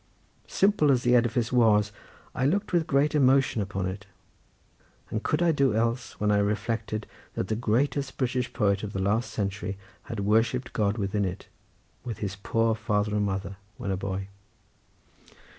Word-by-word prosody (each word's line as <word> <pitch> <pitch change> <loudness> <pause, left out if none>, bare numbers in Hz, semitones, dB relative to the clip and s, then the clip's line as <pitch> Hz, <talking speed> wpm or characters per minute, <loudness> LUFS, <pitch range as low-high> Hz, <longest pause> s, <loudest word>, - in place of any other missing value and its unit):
Simple 195 -7 +3
as 125 -2 +2
the 125 - +3
edifice 120 -1 +2
was, 105 -4 +4 0.4
I 130 - +1
looked 200 +5 0
with 170 -2 +2
great 145 +2 +2
emotion 135 -5 +3
upon 95 -1 -3
it; 95 +1 -5 1.0
and 110 - -1
could 155 +7 0
I 170 - +4
do 140 -7 +2
else, 115 +2 -1
when 105 0 +2
I 105 - +3
reflected 110 +1 -1 0.3
that 95 - -2
the 110 - +1
greatest 125 +5 0
British 125 -1 -1
poet 100 -2 +1
of 105 -1 -5
the 95 - -2
last 105 +6 +1
century 100 -1 -3 0.3
had 115 -3 -4
worshipped 115 +5 +1
God 105 0 +1
within 100 0 -1
it, 95 0 -4 0.5
with 115 -5 -5
his 100 -2 -4
poor 115 +3 +1
father 105 -2 -1
and 105 -1 +1
mother, 95 0 -4 0.2
when 100 - -3
a - - +1
boy? 95 0 -4
110 Hz, 165 wpm, -27 LUFS, 100-125 Hz, 1.0 s, was